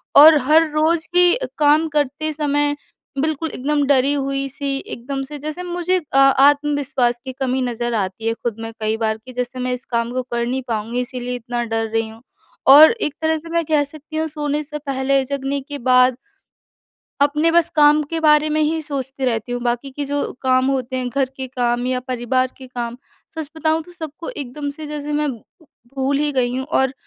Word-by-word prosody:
और 305 +2 +10
हर 320 +1 +5
रोज़ 315 +2 +1
भी 355 0 +5 0.2
काम 300 +2 +4
करते 295 +2 -1
समय 290 -1 0 0.5
बिल्कुल 315 +1 -1
एकदम 290 +3 0
डरी 275 0 +3
हुई-सी 275 0 -2 0.2
एकदम 270 +3 -4
से 295 +2 -8
जैसे 310 +5 -5
मुझे 355 +1 0 0.2
आ - - +6 0.3
आत्मविश्वास 280 -4 +1
की 260 - -4
कमी 265 -1 0
नज़र 240 -1 -2
आती 205 +2 -2
है 225 - +2
ख़ुद 230 -1 -4
में 225 0 -5
कई 215 0 0
बार 220 -1 -1
कि 255 - -10
जैसे 250 +1 -4
मैं 250 0 -1
इस 250 +1 -5
काम 235 0 0
को 255 0 -1
कर 235 0 0
नहीं 255 +2 -2
पाऊँगी 230 +2 -2
इसलिए 250 0 -4
इतना 240 0 -3
डर 225 -1 -1
रही 225 0 -1
हूँ। 225 +1 -14 0.5
और 290 +4 +10
एक 440 -11 -2
तरह 320 0 +1
से 330 +2 -10
मैं 335 0 +1
कह 300 -1 +2
सकती 310 +2 -9
हूँ 320 0 0
सोने 300 -1 -2
से 300 0 -6
पहले 270 0 +1
जगने 280 +1 -2
के 290 +1 -7
बाद 250 0 +5 1.0
अपने 300 +3 +3
बस 340 0 +3
काम 300 0 +6
के 330 -1 -2
बारे 305 -1 +4
में 310 +1 +1
ही 315 +1 +1
सोचती 270 -2 -4
रहती 240 -1 -1
हूँ 245 - -2
बाकी 240 +3 -1
के 285 +2 -4
जो 285 +1 -2
काम 255 0 +3
होते 260 -1 -2
हैं 255 -1 -2
घर 270 +2 +1
के 265 - -4
काम 245 -1 -1
या 255 0 0
परिवार 255 0 0
के 260 - -10
काम 240 -1 -5 0.4
सच 315 -3 -5
बताऊँ 315 0 +1
तो 355 - -16
सबको 320 -2 -8
एकदम 285 - -5
से 305 +2 -8
जैसे 295 0 -5
मैं 295 0 0 0.6
भूल 275 +1 0
ही 295 0 0
गई 250 -2 0
हूँ। 260 - -2
और 265 -4 +1
275 Hz, 200 wpm, -20 LUFS, 250-300 Hz, 1.0 s, और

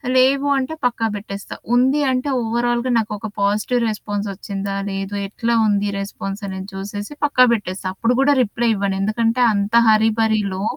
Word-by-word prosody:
లేవు 270 +2 +4
అంటే 265 +4 -2
పక్కా 235 -2 +1
బెట్టేస్తా. 200 -1 -7 0.2
ఉంది 265 +4 +3
అంటే 255 +3 -1
ఓవరాల్‌గా 240 +2 0
నాకొక 215 0 -3
పాజిటివ్ 210 +5 +1
రెస్పాన్సొచ్చిందా? 200 -1 -4 0.2
లేదు? 195 +1 -4
ఎట్లా 235 +3 -1
ఉంది 205 0 +1
రెస్పాన్సనేది 195 -1 -5
చూసేసి 205 +5 -6
పక్కా 255 -3 +5
బెట్టేస్తా. 190 -3 -3
అప్పుడు 235 +4 +1
గూడా 285 +1 +4
రిప్లై 235 +2 -1
ఇవ్వను. 195 -1 -1
ఎందుకంటే 230 +3 +1
అంత 200 +2 -1 0.2
హరి 220 +1 +4
భరిలో 205 -3 0
215 Hz, 140 wpm, -20 LUFS, 200-240 Hz, 0.2 s, పక్కా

